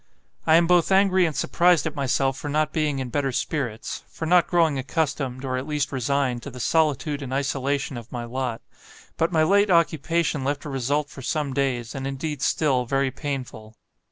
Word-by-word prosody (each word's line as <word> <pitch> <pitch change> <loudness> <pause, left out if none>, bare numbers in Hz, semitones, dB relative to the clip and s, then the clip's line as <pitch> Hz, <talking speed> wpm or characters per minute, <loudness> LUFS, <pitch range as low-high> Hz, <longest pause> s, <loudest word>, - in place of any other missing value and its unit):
"I 160 - +6
am 170 +1 +5
both 175 +1 +3
angry 190 -2 +4
and 155 - -4
surprised 175 -3 +3
at 160 - -2
myself 135 -1 0
for 145 - -6
not 155 +1 0
being 150 -3 0
in 130 -2 -3
better 140 0 0
spirits; 125 -4 -3
for 160 - -6
not 175 +1 +4
growing 165 -5 +2
accustomed, 135 -2 -2
or 130 -1 -1
at 130 +3 -4
least 150 -1 -1
resigned, 130 -1 0
to 140 - -7
the 125 -1 -10
solitude 150 0 +1
and 130 -2 -6
isolation 140 0 -1
of 115 -1 -10
my 120 -2 -4
lot. 120 -1 -4 0.5
But 165 +2 0
my 160 -2 +3
late 200 +4 +4
occupation 165 -3 +1
left 140 +2 -2
a - - -4
result 145 +3 -1
for 135 - -10
some 145 +1 -2
days, 125 -4 -1
and 135 -1 -4
indeed 140 +1 -4
still, 130 -6 +1
very 135 +1 +1
painful. 125 -7 -6
140 Hz, 190 wpm, -24 LUFS, 130-160 Hz, 0.5 s, I